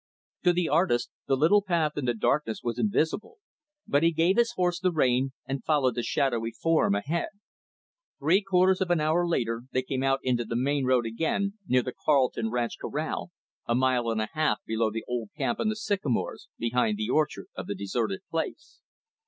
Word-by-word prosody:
To 180 - +4
the 175 -1 0
artist, 155 -6 +2 0.2
the 135 - +2
little 170 +9 +5
path 170 -6 +1
in 145 - -2
the 120 -1 +1
darkness 115 0 0
was 120 -1 -2
invisible, 210 - 0 0.5
but 145 - +2
he 165 +1 +4
gave 165 +4 +2
his 235 0 +2
horse 180 -3 0
the 185 0 +1
rein 130 -4 +1
and 135 -1 -4
followed 140 -5 +2
the 120 - -2
shadowy 120 -2 0
form 160 -6 +1
ahead. 150 +12 -1 0.9
Three 165 +8 +3
quarters 190 -1 +3
of 185 - 0
an 175 -2 +3
hour 160 +3 +2
later, 115 -7 -1
they 130 - 0
came 130 0 -3
out 135 0 +2
into 125 -2 +1
the 115 +1 -5
main 135 +2 +1
road, 125 -2 +3
again; 180 - -1
near 125 0 +3
the 125 - -5
Carleton 130 -6 +1
ranch 120 0 -2
corral, - - -3 0.4
a 120 - +2
mile 125 -2 +2
and 110 -1 0
a 110 - -3
half 155 -1 +1
below 110 0 0
the 110 +1 -5
old 120 -4 -3
camp 120 - -1
in 220 - +1
the 215 - -1
sycamores 200 - -2
behind 125 - 0
the 215 -2 -2
orchard 155 -3 0
of - - -6
the 100 - -3
deserted 100 +1 -2
place. 165 - -4
140 Hz, 195 wpm, -27 LUFS, 120-175 Hz, 0.9 s, little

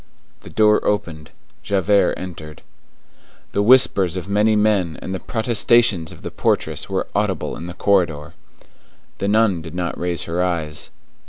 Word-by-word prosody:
The - - -13
door 105 -1 +3
opened. 85 -7 -2 0.3
Javert 100 +7 +2
entered. 80 -4 -9 0.9
The 100 - 0
whispers 100 -6 +4
of 90 0 -6
many 105 +2 +2
men 105 -6 +1
and 95 - -6
the 95 - -3
protestations 115 -6 +1
of - - -14
the - - -6
portress - - -1
were - - -1
audible - - -1
in 85 - -7
the 90 - -8
corridor. 85 -8 0 0.9
The 100 - -1
nun 105 -4 +2
did 80 0 -9
not 90 -1 -3
raise 90 -1 -1
her 85 +2 -2
eyes. 80 -4 -3
95 Hz, 150 wpm, -20 LUFS, 85-105 Hz, 0.9 s, whispers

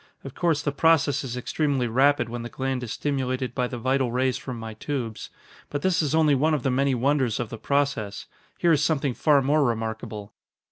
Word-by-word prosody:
Of 135 - -8
course, 160 -4 0
the 145 - 0
process 145 -2 +3
is 125 -2 -5
extremely 140 0 0
rapid 130 +2 +3
when 120 +1 -5
the 120 - -6
gland 130 0 -3
is 120 -3 -5
stimulated 130 -3 -2
by 125 -1 0
the 125 - -6
vital 130 +1 0
rays 130 +1 +1
from 125 -1 -6
my 115 -1 -7
tubes. 115 -1 -5 0.4
But 145 -1 -4
this 185 -2 +2
is 150 -1 0
only 155 -2 +4
one 155 +4 +2
of 145 - -4
the 135 - +1
many 135 +1 +2
wonders 130 -2 +1
of 120 -3 -3
the 115 - -7
process. 140 -8 -1 0.3
Here 170 - +3
is 155 -1 +3
something 145 -3 +1
far 145 +1 +3
more 145 +3 +3
remarkable." 110 -3 -3
135 Hz, 205 wpm, -25 LUFS, 120-145 Hz, 0.4 s, only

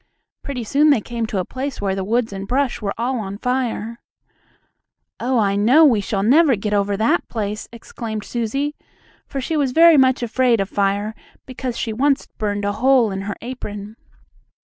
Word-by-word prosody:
Pretty 260 -4 -5
soon 285 +7 +3
they 280 - +5
came 230 +1 -4
to 210 - -3
a 185 - -1
place 265 +1 -5
where 195 -1 -1
the 190 0 -3
woods 225 +2 0
and 195 0 -6
brush 265 +1 0
were 200 -2 -3
all 245 +2 -1
on 200 -2 -5
fire. 235 -2 -2 1.2
"Oh, 255 +1 0
I 200 -3 +2
know 250 +11 +5
we 235 -8 +4
shall 195 0 -2
never 280 +4 +5
get 210 +1 -3
over 200 0 +1
that 220 +2 +1
place!" 210 -2 -4
exclaimed 225 -2 -6
Susie, 260 +7 -2 0.5
for 275 - -4
she 295 +5 -2
was 275 -4 0
very 330 0 +7
much 260 -2 +3
afraid 240 0 +2
of 195 0 -1
fire, 200 +2 0 0.3
because 255 -1 -5
she 225 - -2
once 275 +4 +1
burned 205 -2 -1
a 205 - +1
hole 245 0 +3
in 190 0 -4
her 205 - -3
apron. 210 -4 -7
230 Hz, 185 wpm, -20 LUFS, 205-260 Hz, 1.2 s, very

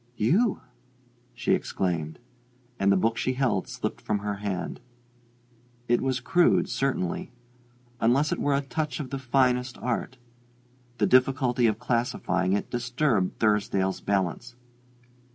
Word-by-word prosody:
"You?" 185 - +2 0.7
she - - +1
exclaimed; 80 -4 -2 0.6
and 100 0 +3
the 100 - +4
book 115 +4 +1
she 130 - 0
held 125 -7 0
slipped - - -4
from 105 - -1
her 100 0 -3
hand. 100 -3 -4 1.1
It 120 0 +2
was 130 -1 0
crude, 175 +8 +3
certainly; 130 -6 -2 0.7
unless 135 +6 +2
it - - -1
were 145 -1 +1
a 140 - +1
touch 140 0 -3
of 135 -4 -5
the 135 - -3
finest 125 -1 +1
art. 125 +1 -3 0.8
The - - +2
difficulty 130 -1 +3
of 110 - +1
classifying 95 -6 0
it 100 - -2
disturbed 120 -4 0
Thursdale's 100 -3 +1
balance. 100 +5 -1
120 Hz, 130 wpm, -26 LUFS, 100-130 Hz, 1.1 s, the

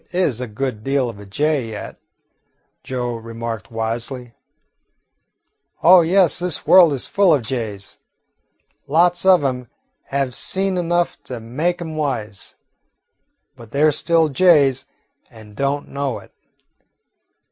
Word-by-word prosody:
"Kit - - -12
is 145 -10 0
a 125 - -4
good 110 0 -4
deal 135 -1 0
of 100 - -15
a 105 - -12
jay 145 +2 -1
yet," 105 -1 -8 0.8
Joe 125 -2 -3
remarked 115 -1 -6
wisely. 115 +2 -4 1.5
"Oh, 180 +2 +8
yes, 175 0 +2
this 175 -3 -1
world 180 -4 +7
is 135 - -4
full 195 -3 +3
of 145 -6 +2
jays. 110 -5 -6 0.9
Lots 175 +5 +2
of 185 -5 +6
'em 125 -2 -2 0.4
have 135 -2 -2
seen 190 +7 -1
enough 175 0 -1
to 125 -2 -6
make 150 +11 -2
'em 160 -2 -7
wise, 120 -9 -4 1.0
but 115 -2 -14
they 140 +5 0
're 155 - +5
still 165 +1 +2
jays, 140 -5 +3 0.4
and 110 -2 -15
don't 140 +3 -2
know 140 -3 -3
it. - - -15
135 Hz, 135 wpm, -20 LUFS, 115-165 Hz, 1.5 s, Oh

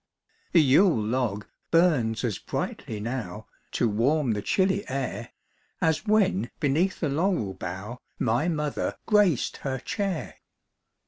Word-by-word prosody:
The 165 - +7
yule 150 - +5
log 110 -2 -1 0.2
burns 145 -11 +3
as 110 -6 -1
brightly 110 - -4
now 110 -3 -4 0.3
To 120 - +2
warm 125 +6 +2
the 105 -1 -1
chilly 190 - +1
air, 135 0 -3 0.5
As 160 +6 +1
when 190 - +2
beneath 165 +6 +1
the 160 - +1
laurel 150 - 0
bough 95 +6 -6 0.2
My 120 +7 +1
mother 150 -4 -2
graced 205 - +3
her 135 -1 -3
chair. 195 - -3
135 Hz, 125 wpm, -26 LUFS, 110-170 Hz, 0.5 s, The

